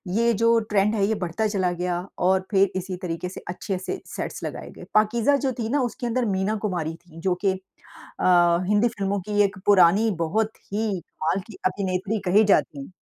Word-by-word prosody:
ये 235 +1 +3
जो 230 0 +4
ट्रेंड 210 +1 +2
है 200 - +2
ये 220 - +1
बढ़ता 185 +3 -1
चला 190 -4 0
गया 175 0 -2 0.2
और 190 +1 +2
फिर 195 -1 +3
इसी 185 0 -3
तरीके 180 0 -4
से 185 - -9
अच्छे 185 +1 -3
से 280 - -5
सेट्स - - -6
लगाए - - -6
गए। - - -12
पाकीज़ा 225 +6 +3
जो 270 -1 -1
थी 225 -1 -2
ना, 285 +2 +1
उसके 245 0 -3
अंदर 240 +1 0
मीना 195 +3 0
कुमारी 175 -6 -2
थी, 165 -1 -16
जो 180 +1 0
कि 195 - +5 0.7
अ, - - -1 0.4
हिंदी 210 +3 +3
फ़िल्मों 200 -3 -2
की 205 0 +1
एक 195 0 -2
पुरानी 200 +3 +5
बहुत 220 +6 -1 0.2
ही 220 +1 0
कमाल 165 +4 -3
की 220 - -11
अभिनेत्री 190 +2 -1
कही 210 +3 +6
जाती 150 -8 +2
है। - - -13
200 Hz, 200 wpm, -24 LUFS, 180-220 Hz, 0.7 s, कही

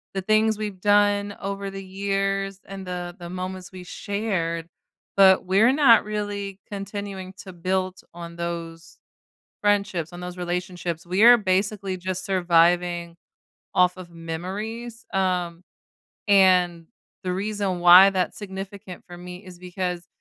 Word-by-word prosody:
the 195 - -1
things 215 +2 +2
we've 205 -4 -5
done 205 0 +3
over 200 0 -4
the 195 0 -7
years 195 0 -2
and 195 -1 -8
the 175 -1 -5
the 175 -1 -9
moments 185 0 -6
we 185 -1 -9
shared, 180 -6 -3 0.5
but 190 -1 +6
we're 200 +7 +4
not 265 -6 +6
really 205 -2 -4
continuing 195 -1 -6
to 190 -2 -10
build 185 +1 -2
on 170 0 -9
those 170 -1 -6 0.6
friendships, 200 -5 0
on 175 - -8
those 180 0 -7
relationships, 175 -1 -4
we 185 +3 0
are 240 +1 +10
basically 195 -1 -1
just 185 0 -4
surviving 175 -2 +2 0.6
off 180 0 +3
of 185 -2 -10
memories, 200 +8 -6
um, 180 -3 -1 0.7
and 180 -4 +4 0.4
the 180 - -1
reason 195 -1 -2
why 180 +3 +9
that's 185 -2 -2
significant 195 -2 -8
for 175 - -9
me 180 0 -9
is 180 -2 -12
because 180 -1 -4
185 Hz, 135 wpm, -24 LUFS, 175-200 Hz, 0.7 s, are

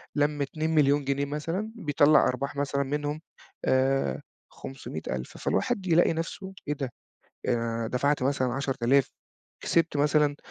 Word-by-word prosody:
لمّ 145 0 +1
2.000.000 145 -1 +2
جنيه 140 +1 0
مثلًا، 165 +9 -3
بيطلّع 150 - +4
أرباح 135 +3 -2
مثلًا 140 0 0
منهم 145 +2 -3 0.4
آآ 130 - +2 0.3
500000، 80 - -6
فالواحد 190 -2 -1
يلاقي 170 -1 +4
نفسه، 190 +4 -5
"إيه 150 - +1
ده؟ 135 -4 -4 0.6
أنا 115 -1 0
دفعت 140 +3 +1
مثلًا 130 -2 +1
10000 135 -1 +1 0.5
كسبت 165 -2 +2
مثلًا 145 0 +3
140 Hz, 120 wpm, -27 LUFS, 135-150 Hz, 0.6 s, بيطلّع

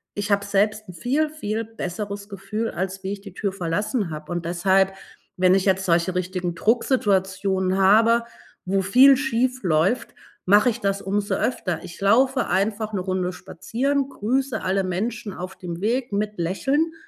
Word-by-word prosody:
ich 205 0 -3
hab 200 0 +3
selbst 205 +1 0
'n 180 - -8
viel, 280 - 0
viel 225 -7 -3
besseres 200 -1 -6
Gefühl, 200 +3 -4
als 190 +1 -4
wie 190 - -3
ich 205 - -7
die 200 -3 -11
Tür 200 0 -2
verlassen 195 +2 -2
habe 155 +2 -7
und 175 -1 -3
deshalb, 190 +3 +2 0.4
wenn 185 +1 +4
ich 195 - +1
jetzt 190 -1 +2
solche 170 +1 +1
richtigen 180 -1 -2
Drucksituationen 195 -4 +1
habe, 225 +4 +5 0.4
wo 195 +1 +1
viel 255 +8 +6
schiefläuft, 240 - +1 0.4
mache 205 +6 +5
ich 235 - -7
das 195 0 0
umso 200 +1 -1
öfter, 185 -9 -2
ich 175 -1 -10
laufe 255 +6 +3
einfach 210 +3 -1
'ne 190 - -1
Runde 185 -1 -2
spazieren, 270 +11 -2
grüße 265 +3 -1
alle 190 +1 +1
Menschen 205 +3 -3
auf 185 +1 -7
dem 175 -1 -6
Weg 240 +2 0
mit 210 0 -2
Lächeln 270 - 0
200 Hz, 160 wpm, -23 LUFS, 185-225 Hz, 0.4 s, viel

